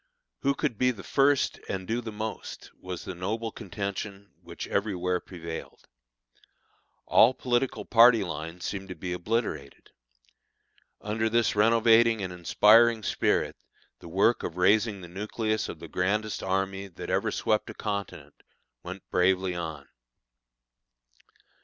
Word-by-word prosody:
Who 140 Hz, 0 st, +1 dB
could 140 Hz, -9 st, -2 dB
be 125 Hz, -, +4 dB
the 115 Hz, -6 st, -5 dB
first 140 Hz, 0 st, +2 dB
and 95 Hz, -1 st, -4 dB
do 115 Hz, +2 st, -1 dB
the 110 Hz, -2 st, -6 dB
most, 110 Hz, +1 st, -6 dB
was 90 Hz, -2 st, -7 dB
the -, -, -5 dB
noble 110 Hz, +6 st, -3 dB
contention 100 Hz, -1 st, -6 dB
which -, -, -7 dB
everywhere 90 Hz, -3 st, -1 dB
prevailed. 85 Hz, -3 st, -9 dB, 1.2 s
All 125 Hz, +3 st, +5 dB
political 125 Hz, +1 st, -1 dB
party 115 Hz, -2 st, +6 dB
lines 85 Hz, 0 st, -6 dB
seemed 95 Hz, -1 st, -4 dB
to 90 Hz, -, -6 dB
be 90 Hz, +2 st, -4 dB
obliterated. 90 Hz, -, -3 dB, 1.1 s
Under 110 Hz, +1 st, -1 dB
this 115 Hz, -1 st, +2 dB
renovating 115 Hz, 0 st, +4 dB
and 90 Hz, -1 st, -4 dB
inspiring 110 Hz, +6 st, +5 dB
spirit -, -, 0 dB, 0.4 s
the -, -, -12 dB
work 100 Hz, +7 st, +3 dB
of 85 Hz, -, -5 dB
raising 100 Hz, +2 st, +3 dB
the 90 Hz, -, -9 dB
nucleus 110 Hz, +4 st, -2 dB
of -, -, -6 dB
the -, -, -10 dB
grandest 105 Hz, +3 st, -1 dB
army 95 Hz, +1 st, -2 dB
that 90 Hz, -, -7 dB
ever -, -, +1 dB
swept 110 Hz, -, 0 dB
a -, -, -8 dB
continent 100 Hz, -2 st, -5 dB, 0.5 s
went 95 Hz, +2 st, -9 dB
bravely 95 Hz, 0 st, +2 dB
on. 80 Hz, -5 st, -6 dB
100 Hz, 135 wpm, -27 LUFS, 90-115 Hz, 1.2 s, party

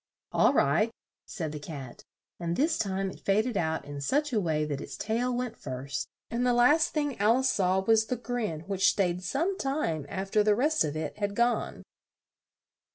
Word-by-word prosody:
"All -, -, +4 dB
right," 160 Hz, +11 st, +3 dB, 0.4 s
said 160 Hz, -6 st, -4 dB
the 150 Hz, -, -6 dB
Cat; 140 Hz, -5 st, -8 dB, 0.4 s
and 170 Hz, 0 st, -2 dB
this 310 Hz, -, +1 dB
time 195 Hz, -2 st, -1 dB
it -, -, -12 dB
faded 215 Hz, +4 st, +1 dB
out 160 Hz, -3 st, -1 dB
in 145 Hz, 0 st, -7 dB
such 290 Hz, -, 0 dB
a 220 Hz, -, +3 dB
way 155 Hz, -4 st, 0 dB
that 145 Hz, -2 st, -3 dB
its -, -, -7 dB
tail 235 Hz, +4 st, -1 dB
went 245 Hz, -1 st, -2 dB
first, 130 Hz, +1 st, -5 dB, 0.2 s
and 235 Hz, +1 st, 0 dB
the 250 Hz, -1 st, +3 dB
last 295 Hz, +7 st, +5 dB
thing 290 Hz, -6 st, -2 dB
Al 215 Hz, +4 st, +4 dB
ice 260 Hz, 0 st, +2 dB
saw 190 Hz, -2 st, +2 dB
was 220 Hz, +2 st, +3 dB
the 250 Hz, -, -1 dB
grin 225 Hz, -9 st, -3 dB
which 195 Hz, +2 st, +2 dB
stayed 180 Hz, -3 st, 0 dB
some 335 Hz, -, -1 dB
time 220 Hz, -, -1 dB
af 195 Hz, +1 st, -4 dB
ter 215 Hz, -, +4 dB
the 210 Hz, 0 st, +4 dB
rest 300 Hz, +7 st, +2 dB
of 155 Hz, -1 st, -3 dB
it 155 Hz, +5 st, -5 dB
had 205 Hz, -1 st, -1 dB
gone. 235 Hz, +1 st, 0 dB
205 Hz, 195 wpm, -29 LUFS, 160-245 Hz, 0.4 s, last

